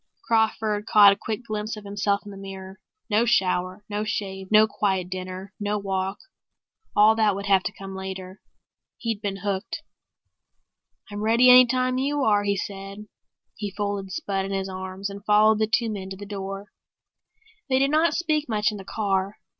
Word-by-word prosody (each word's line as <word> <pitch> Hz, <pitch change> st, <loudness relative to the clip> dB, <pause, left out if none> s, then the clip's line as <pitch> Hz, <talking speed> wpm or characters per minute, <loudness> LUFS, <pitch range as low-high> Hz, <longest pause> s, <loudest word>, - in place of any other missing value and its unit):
Crawford 220 Hz, -, +1 dB
caught 205 Hz, -2 st, +7 dB
a -, -, -5 dB
quick 220 Hz, +3 st, -5 dB
glimpse 215 Hz, 0 st, -4 dB
of 210 Hz, -, -9 dB
himself 200 Hz, 0 st, -1 dB
in 205 Hz, -, -8 dB
the -, -, -10 dB
mirror. 190 Hz, 0 st, -9 dB, 0.3 s
No 215 Hz, +1 st, +3 dB
shower, 185 Hz, -3 st, 0 dB
no 210 Hz, 0 st, -2 dB
shave, 195 Hz, -3 st, -4 dB
no 215 Hz, 0 st, +7 dB
quiet 190 Hz, -4 st, -1 dB
dinner, 185 Hz, +1 st, -6 dB
no 205 Hz, 0 st, -1 dB
walk; 195 Hz, -1 st, -2 dB, 0.8 s
all 210 Hz, +1 st, +6 dB
that 215 Hz, -3 st, +2 dB
would 200 Hz, +1 st, -5 dB
have 195 Hz, -2 st, +4 dB
to -, -, -3 dB
come 195 Hz, -1 st, -9 dB
later. 190 Hz, 0 st, -7 dB, 0.6 s
He'd 225 Hz, -3 st, -3 dB
been 195 Hz, -2 st, -4 dB
hooked. 195 Hz, -2 st, -3 dB, 1.3 s
"I'm 205 Hz, 0 st, -5 dB
ready 230 Hz, +4 st, +5 dB
any 250 Hz, 0 st, +9 dB
time 255 Hz, 0 st, 0 dB
you 285 Hz, +1 st, 0 dB
are," 205 Hz, -3 st, +3 dB
he 200 Hz, 0 st, +1 dB
said. 195 Hz, +2 st, -6 dB, 0.5 s
He 205 Hz, -1 st, -4 dB
folded 200 Hz, -1 st, -3 dB
Spud 195 Hz, +1 st, -2 dB
in 195 Hz, -, -5 dB
his 195 Hz, -1 st, -2 dB
arms 190 Hz, +1 st, -5 dB
and 200 Hz, 0 st, -9 dB
followed 215 Hz, +1 st, +4 dB
the 220 Hz, -, +2 dB
two 225 Hz, +1 st, +1 dB
men 190 Hz, -2 st, -6 dB
to 190 Hz, -, -7 dB
the 205 Hz, -, -8 dB
door. 195 Hz, 0 st, -6 dB, 1.0 s
They 260 Hz, -, +3 dB
did 275 Hz, +1 st, +2 dB
not 320 Hz, +2 st, +3 dB
speak 310 Hz, -4 st, 0 dB
much 215 Hz, -1 st, +1 dB
in 210 Hz, -, -6 dB
the 195 Hz, -, -9 dB
car. 195 Hz, -1 st, -1 dB
205 Hz, 180 wpm, -25 LUFS, 195-215 Hz, 1.3 s, any